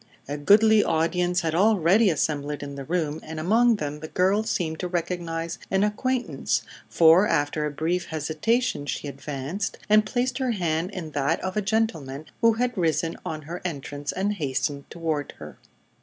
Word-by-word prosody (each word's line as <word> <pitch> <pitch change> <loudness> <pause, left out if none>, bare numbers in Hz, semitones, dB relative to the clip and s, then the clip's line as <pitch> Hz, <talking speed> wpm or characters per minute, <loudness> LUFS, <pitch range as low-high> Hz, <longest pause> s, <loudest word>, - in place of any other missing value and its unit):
A 145 - -3
goodly 210 +8 +5
audience 175 +3 +1
had 160 -2 -1
already 200 +2 +4
assembled 150 -2 -1
in 140 0 -6
the 140 0 -6
room, 160 -1 -1
and 160 0 -7
among 225 +8 +4
them 150 -6 -4
the 155 - -7
girl 190 +5 +2
seemed 175 -7 -2
to 180 - -2
recognize 170 -1 -3
an 190 +1 +2
acquaintance, 250 +5 -1 0.3
for 170 +5 +6
after 150 -1 0
a - - -4
brief 170 +4 -1
hesitation 160 - -1
she 145 - -3
advanced 140 +6 -4
and 215 0 +5
placed 250 +4 -1
her 255 -3 0
hand 170 -3 -1
in 175 -6 -6
that 145 +3 0
of 185 0 -3
a 210 - +1
gentleman 170 -10 -1 0.2
who 230 -1 +5
had 245 +2 -1
risen 165 -2 0
on 160 -3 -5
her 170 +4 -7
entrance 145 -3 -4
and 200 +2 -1
hastened 140 -4 -2
toward 160 -4 -3
her. - - -11
170 Hz, 170 wpm, -25 LUFS, 150-205 Hz, 0.3 s, for